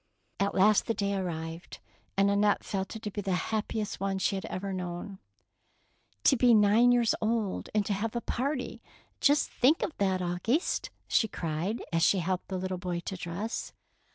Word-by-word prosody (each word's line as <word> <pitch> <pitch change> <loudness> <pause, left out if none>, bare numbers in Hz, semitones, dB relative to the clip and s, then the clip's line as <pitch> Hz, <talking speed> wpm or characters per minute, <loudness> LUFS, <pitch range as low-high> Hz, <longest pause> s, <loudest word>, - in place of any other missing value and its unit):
At 200 0 0
last 205 +2 +4
the 230 - 0
day 200 0 -1
arrived, 170 -2 -4 0.4
and 200 +1 +4
Annette 205 0 +2
felt 195 +1 -3
it 220 - -8
to 210 - -3
be 205 - -3
the 195 -2 -1
happiest 215 +2 -2
one 195 0 -1
she 190 - +1
had 190 - -3
ever 195 +1 -4
known. 180 +1 -5 0.5
" - - -41
To 275 - +6
be 245 -2 +5
nine 215 +4 +5
years 240 -2 +3
old 220 -3 -1
and 210 -1 +2
to 205 - 0
have 215 +4 -2
a 235 - -1
party! 270 +3 -3 0.4
Just 290 +1 +3
think 280 +6 +3
of 310 - -3
that, 190 -2 +1
Auguste! 180 - 0 0.2
she 220 - +3
cried, 170 +4 -3
as 165 - +2
she 195 - +4
helped 185 +1 -2
the 190 - -3
little 185 0 -3
boy 180 -1 -3
to 190 - -5
dress. 180 +6 -4
200 Hz, 185 wpm, -29 LUFS, 185-220 Hz, 0.5 s, To